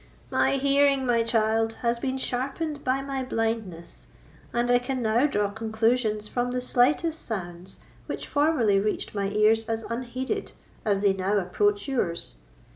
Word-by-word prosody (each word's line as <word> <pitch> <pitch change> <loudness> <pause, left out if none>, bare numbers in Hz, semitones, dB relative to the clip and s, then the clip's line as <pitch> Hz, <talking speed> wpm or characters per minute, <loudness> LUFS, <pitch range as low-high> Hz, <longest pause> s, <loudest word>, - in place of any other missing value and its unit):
"My - - +3
hearing, 275 0 +3
my 240 -2 +3
child, 225 -1 +1
has 235 0 +1
been 260 +1 -2
sharpened 280 +4 -3
by 265 +1 0
my 275 -1 -3
blindness, 225 -8 -3 0.4
and 240 +1 +1
I 245 - +5
can 250 0 -3
now 230 +6 +3
draw 205 -6 0
conclusions 220 0 0
from 245 +2 -1
the 250 0 -1
slightest 295 +6 +1
sounds, 180 -4 -5 0.3
which - - -5
formerly 285 -10 +3
reached 210 +1 -1
my 200 -1 -1
ears 215 +2 +3
as 225 0 -1
unheeded 255 - -3 0.3
as 200 -2 +2
they 200 -1 +4
now 195 +2 0
approach 205 +2 +1
yours. 180 - -2
230 Hz, 150 wpm, -26 LUFS, 210-260 Hz, 0.4 s, I